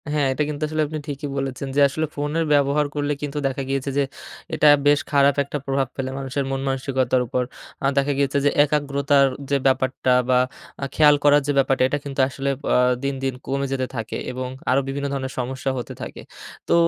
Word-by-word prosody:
হ্যাঁ, 145 Hz, -2 st, +2 dB
এটা 150 Hz, -, 0 dB
কিন্তু 150 Hz, 0 st, -4 dB
আসলে 155 Hz, 0 st, -1 dB
আপনি 155 Hz, +1 st, -5 dB
ঠিকি 145 Hz, 0 st, -5 dB
বলেছেন. 135 Hz, 0 st, -3 dB
যে -, -, +3 dB
আসলে 155 Hz, +3 st, -1 dB
ফোনের 150 Hz, +3 st, -1 dB
ব্যবহার 145 Hz, +1 st, +3 dB
করলে 145 Hz, 0 st, -1 dB
কিন্তু 145 Hz, 0 st, -4 dB
দেখা 135 Hz, +1 st, -3 dB
গিয়েছে 135 Hz, 0 st, -1 dB
যে 140 Hz, -, +4 dB, 0.5 s
এটা 155 Hz, -1 st, +4 dB, 0.2 s
বেশ 145 Hz, 0 st, +5 dB
খারাপ 140 Hz, -1 st, +4 dB
একটা 140 Hz, +1 st, -4 dB
প্রভাব 135 Hz, -1 st, 0 dB
ফেলে 130 Hz, -1 st, -3 dB
মানুষের 135 Hz, +1 st, -2 dB
মনমানসিকতার 135 Hz, -1 st, 0 dB
উপর। 125 Hz, +1 st, 0 dB, 0.4 s
এ্যাঁ 135 Hz, -, +1 dB
দেখা 140 Hz, +1 st, +2 dB
গিয়েছে 140 Hz, 0 st, +1 dB
যে -, -, +6 dB, 0.2 s
একাগ্রতার 140 Hz, -1 st, +2 dB, 0.2 s
যে 140 Hz, -, +3 dB
ব্যাপারটা 130 Hz, -1 st, +1 dB, 0.2 s
বা 125 Hz, 0 st, +5 dB, 0.4 s
এ্যাঁ 140 Hz, -, -3 dB
খেয়াল 150 Hz, -1 st, +6 dB
করার 145 Hz, 0 st, +6 dB
যে -, -, +2 dB
ব্যাপারটা 135 Hz, -1 st, +3 dB
এটা 145 Hz, -, -1 dB
কিন্তু 140 Hz, -1 st, -5 dB
আসলে 135 Hz, +1 st, -3 dB, 0.2 s
এ্যাঁ 125 Hz, 0 st, +4 dB
দিন, 140 Hz, 0 st, -1 dB
দিন 135 Hz, -1 st, 0 dB
কমে 140 Hz, +1 st, -1 dB
যেতে 130 Hz, -1 st, -1 dB
থাকে 115 Hz, -2 st, -4 dB
এবং 130 Hz, 0 st, -4 dB, 0.2 s
আরও 135 Hz, +2 st, +4 dB
বিভিন্ন 140 Hz, +1 st, -2 dB
ধরনের 130 Hz, -1 st, -3 dB
সমস্যা 130 Hz, +2 st, -3 dB
হতে 125 Hz, -, -5 dB
থাকে. -, -, -7 dB, 0.5 s
তো -, -, +2 dB
140 Hz, 195 wpm, -22 LUFS, 135-145 Hz, 0.5 s, যে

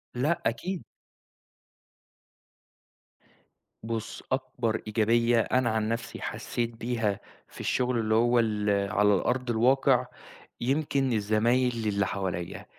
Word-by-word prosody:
لأ، 150 Hz, +7 st, 0 dB
أكيد. 165 Hz, +11 st, -2 dB, 3.0 s
بُص، 115 Hz, 0 st, -5 dB
أكبر 130 Hz, -4 st, -1 dB
إيجابية 115 Hz, +2 st, +3 dB
أنا 125 Hz, +2 st, +1 dB
عن 110 Hz, 0 st, 0 dB
نفْسي 115 Hz, 0 st, -4 dB
حسّيت 120 Hz, -1 st, -3 dB
بيها، 115 Hz, -3 st, -1 dB, 0.3 s
في -, -, -14 dB
الشغل 125 Hz, -1 st, 0 dB
اللي 110 Hz, 0 st, +1 dB
هو 120 Hz, +1 st, +4 dB
ال 105 Hz, -2 st, 0 dB, 0.2 s
على 105 Hz, -1 st, +4 dB
الأرض 125 Hz, +6 st, -1 dB
الواقع، 125 Hz, +4 st, +3 dB, 0.6 s
يمكن 135 Hz, 0 st, +1 dB
الزمايل 115 Hz, +2 st, +1 dB
اللي 100 Hz, -1 st, +1 dB
حواليّا، 90 Hz, -3 st, -4 dB
115 Hz, 105 wpm, -28 LUFS, 110-125 Hz, 3.0 s, هو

